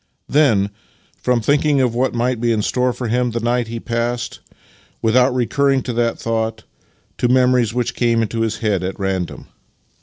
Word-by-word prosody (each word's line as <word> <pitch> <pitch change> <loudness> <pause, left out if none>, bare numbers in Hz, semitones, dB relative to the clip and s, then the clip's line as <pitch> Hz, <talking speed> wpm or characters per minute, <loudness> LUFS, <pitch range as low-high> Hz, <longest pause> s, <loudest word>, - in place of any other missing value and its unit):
" - - -50
Then, 115 -10 +3 0.5
from 125 -2 +1
thinking 145 +3 +2
of 125 -3 +2
what 125 +1 0
might 120 0 0
be 120 -1 +2
in 110 -2 0
store 125 +3 +1
for 125 0 -5
him 125 +2 +1
that 115 0 -4
night 120 0 +1
he 115 0 -5
passed, 120 +1 -3 0.6
without 125 +3 +3
recurring 135 +2 +1
to 125 - -3
that 115 0 0
thought, 110 -1 -2 0.6
to 125 - +2
memories 125 -2 +3
which 125 +1 -1
came 115 -2 +1
into 115 +1 -3
his 110 -1 -1
head 100 -4 +1
at 95 +2 -4
random. 95 -3 -3
120 Hz, 180 wpm, -19 LUFS, 115-125 Hz, 0.6 s, Then